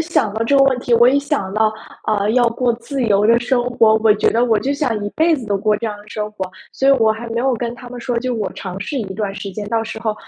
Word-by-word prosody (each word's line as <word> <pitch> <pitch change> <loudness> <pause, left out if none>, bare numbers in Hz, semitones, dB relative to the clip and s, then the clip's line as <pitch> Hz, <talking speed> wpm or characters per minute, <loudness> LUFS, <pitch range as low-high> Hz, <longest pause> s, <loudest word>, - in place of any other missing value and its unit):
想 325 -10 0
到 220 +2 -2
这 280 +4 +3
个 275 - +6
问 260 -2 +2
题， 245 -1 +1
我 235 +1 +6
一 275 +2 +3
想 280 -10 -2
到， 215 +1 +2 0.3
呃， 210 -1 +1
要 245 +1 +3
过 240 +1 0
自 255 +3 -4
由 210 -3 +3
的 230 +1 +5
生 245 0 +1
活， 225 -3 +4
我 220 -1 +4
觉 210 - +2
得 235 +2 +2
我 225 -3 +2
就 275 +6 -1
想 240 -8 -1
一 205 - -3
辈 325 +1 +2
子 265 - -5
都 200 -1 0
过 210 +1 +1
这 230 - -6
样 210 - -4
的 205 - -15
生 210 -1 -4
活， 190 -3 -5 0.2
所 270 - +1
以 275 - +7
我 225 -5 +3
还 220 +2 -4
没 230 +1 -1
有 265 +1 +1
跟 235 0 -4
他 245 0 -11
们 245 0 -8
说， 245 -1 -2
就 255 +1 -2
我 210 -4 -2
尝 190 -1 -7
试 280 - -4
一 195 -4 -5
段 200 -2 -3
时 200 0 -6
间， 205 +2 -6
到 225 0 0
时 220 0 -6
候 220 -2 -1
230 Hz, 320 characters per minute, -18 LUFS, 210-250 Hz, 0.3 s, 以